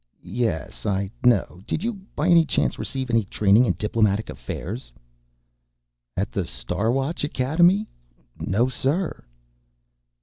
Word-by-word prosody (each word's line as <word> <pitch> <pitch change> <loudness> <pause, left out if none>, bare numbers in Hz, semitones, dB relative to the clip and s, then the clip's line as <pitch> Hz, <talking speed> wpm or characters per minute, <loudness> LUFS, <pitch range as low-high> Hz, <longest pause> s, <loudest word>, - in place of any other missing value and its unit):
"Yes, 115 -10 -2
I 100 -1 0
know. 120 -7 +2
Did 165 - -2
you, 235 +1 0 0.2
by 150 - 0
any 170 -2 +7
chance, - - 0
receive 130 -2 -3
any 115 -1 +3
training 105 +4 +4
in 90 - +2
diplomatic 105 0 +1
affairs?" 105 - -6 1.3
"At - - -1
the - - -1
Star 90 - -1
Watch 135 +6 -1
Academy? 170 +9 +3 0.5
No, 115 +6 +1
sir." 140 +8 -1
120 Hz, 125 wpm, -24 LUFS, 100-150 Hz, 1.3 s, any